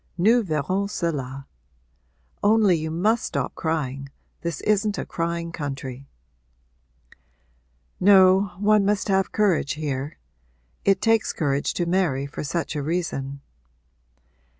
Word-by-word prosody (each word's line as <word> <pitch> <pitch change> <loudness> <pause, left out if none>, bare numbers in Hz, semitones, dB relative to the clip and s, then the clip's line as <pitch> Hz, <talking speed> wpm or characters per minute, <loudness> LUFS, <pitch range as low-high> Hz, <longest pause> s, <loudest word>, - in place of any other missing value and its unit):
Nous 225 +7 +4
verrons 185 +4 -1
cela. 140 -8 -3 1.0
Only 210 -3 +4
you 160 0 -3
must 210 +8 +1
stop 140 -3 -2
crying 140 -4 -3 0.3
this 170 -3 -3
isn't 210 0 +1
a - - -3
crying 170 0 -3
country.' 135 -4 -6 1.9
'No, 190 0 +6
one 210 +1 +3
must 205 +1 0
have 195 -1 +2
courage 190 -9 +1
here. 145 -2 -4 0.7
It 195 -1 +2
takes 225 -1 +2
courage 140 -3 -1
to 175 - 0
marry 170 -7 +1
for 140 - -6
such 160 +2 -3
a 150 - -1
reason.' 140 -4 -3
170 Hz, 115 wpm, -24 LUFS, 140-200 Hz, 1.9 s, No